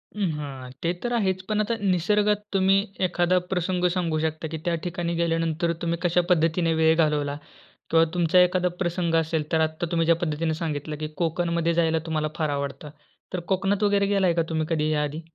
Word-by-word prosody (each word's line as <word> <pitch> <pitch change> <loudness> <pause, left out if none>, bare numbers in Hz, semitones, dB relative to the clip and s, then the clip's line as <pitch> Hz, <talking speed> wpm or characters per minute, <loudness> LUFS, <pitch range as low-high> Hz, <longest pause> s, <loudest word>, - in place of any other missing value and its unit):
हं, 200 -4 0
हां. 135 -3 -7
ते 170 - +2
तर 240 - -1
आहेच. 190 -5 0
पण 215 0 +1
आता 220 +2 -1
निसर्गात 205 +2 +1
तुम्ही 195 0 +4 0.3
एखादा 175 +1 +2
प्रसंग 180 0 0
सांगू 165 -3 0
शकता 160 0 -2
की - - -2
त्या 170 - +2
ठिकाणी 170 -1 -2
गेल्यानंतर 165 0 0
तुम्ही 170 0 -1
कशा 175 0 +3
पद्धतीने 165 0 +2
वेळ 160 0 +4
घालवला 150 -3 +1 0.5
किंवा 165 0 +5
तुमचा 175 0 +3
एखादा 180 0 +2 0.2
प्रसंग 175 -1 0
असेल, 160 -1 -3
तर 160 - +2
आता 155 +2 -5
तुम्ही 165 -1 +1
ज्या 165 0 +4
पद्धतीने 160 0 -1
सांगितलं 155 -2 -4
की 155 - -3
कोकणमध्ये 170 0 0
जायला 165 -1 +2
तुम्हाला 155 -2 -1
फार 155 -2 0
आवडतं. 140 +2 -5 0.4
तर 180 - -1
कोकणात 195 +2 0
वगैरे 200 -1 +3
गेलाय 195 -3 +2
का 165 - +1
तुम्ही 160 -1 -1
कधी 155 -2 +1
या 150 -1 +1
आधी? 150 +2 -4
170 Hz, 190 wpm, -25 LUFS, 160-180 Hz, 0.5 s, किंवा